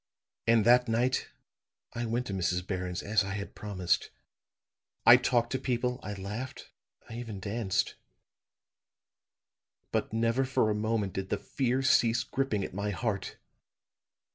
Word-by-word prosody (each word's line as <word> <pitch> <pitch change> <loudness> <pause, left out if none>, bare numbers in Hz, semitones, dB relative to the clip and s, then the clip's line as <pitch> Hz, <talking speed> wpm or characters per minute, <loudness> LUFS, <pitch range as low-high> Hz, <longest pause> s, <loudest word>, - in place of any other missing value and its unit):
"And 115 -2 +5
that 125 +1 +6
night 120 +3 +1 0.6
I 120 0 -2
went 120 +2 -1
to 100 - -4
Mrs. 90 -1 0
Barron's 90 -2 -3
as 105 0 +2
I 95 0 -4
had 100 0 -5
promised. 95 -4 -1 1.0
I - - +11
talked 120 -2 +1
to 130 - 0
people 125 -1 -1
I 105 - -5
laughed 105 +7 -6 0.4
I 115 - -9
even 110 -5 -6
danced. 100 -1 -1 2.0
But - - -1
never 115 +3 +1
for 130 -4 +2
a - - +2
moment 105 -2 -1
did 95 0 -4
the 105 - 0
fear 130 +5 -1
cease 120 -2 +4
gripping 125 -6 -1
at - - -6
my 100 +2 -2
heart. 105 -1 -3
110 Hz, 140 wpm, -30 LUFS, 100-120 Hz, 2.0 s, I